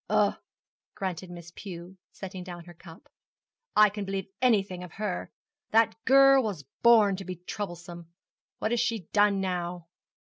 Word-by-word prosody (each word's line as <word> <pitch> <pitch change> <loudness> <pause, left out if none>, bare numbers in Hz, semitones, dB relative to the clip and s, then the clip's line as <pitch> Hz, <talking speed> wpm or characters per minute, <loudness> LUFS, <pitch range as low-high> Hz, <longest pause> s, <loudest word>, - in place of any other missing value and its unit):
'Ah,' - - +2 0.6
grunted 185 -1 -4
Miss 175 -1 -10
Pew, 180 -1 -9 0.2
setting 185 -1 -8
down 175 -1 -8
her 175 +1 -13
cup; 165 0 -15 0.7
'I 210 0 +7
can 205 +1 -5
believe 195 -1 -4
anything 195 -7 +2
of 180 - -10
her. 205 -4 -4 0.4
That 225 0 +4
girl 275 0 +7
was 200 - -4 0.2
born 220 -4 +6
to 195 - -6
be 185 -1 -6
troublesome. 175 -2 -7 0.5
What 220 - -2
has 240 - +1
she 230 -2 0
done 205 -1 +4
now?' 175 -2 -3
190 Hz, 150 wpm, -28 LUFS, 175-215 Hz, 0.7 s, I